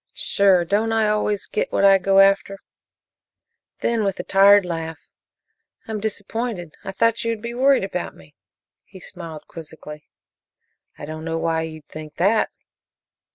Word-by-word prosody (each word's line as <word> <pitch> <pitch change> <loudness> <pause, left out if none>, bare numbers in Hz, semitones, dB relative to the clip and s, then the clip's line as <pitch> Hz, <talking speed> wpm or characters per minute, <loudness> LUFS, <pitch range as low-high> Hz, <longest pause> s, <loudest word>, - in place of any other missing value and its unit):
"Sure. 190 -3 +3
Don't 210 +5 0
I 220 -1 +2
always 210 -1 0
get - - -3
what 200 - +2
I 195 -1 +6
go 195 +1 +2
after?" 195 0 +2 1.2
Then, 230 -2 0
with 195 -2 -2
a - - -3
tired 200 0 +5
laugh, 165 -2 -4 0.9
"I'm 220 -1 -4
disappointed; 205 -3 -4
I 195 - -5
thought 230 +3 +1
you 230 - -1
would 225 - -4
be 235 0 -5
worried 265 +2 +3
about - - -4
me." - - -18 0.5
He 190 - -13
smiled 165 -5 -9
quizzically. 150 -2 -11 0.9
"I - - -8
don't 155 +1 -7
know 165 0 -3
why 165 0 0
you'd 155 -2 -8
think 155 -1 -10
that." 205 +5 +2
195 Hz, 155 wpm, -22 LUFS, 165-215 Hz, 1.2 s, I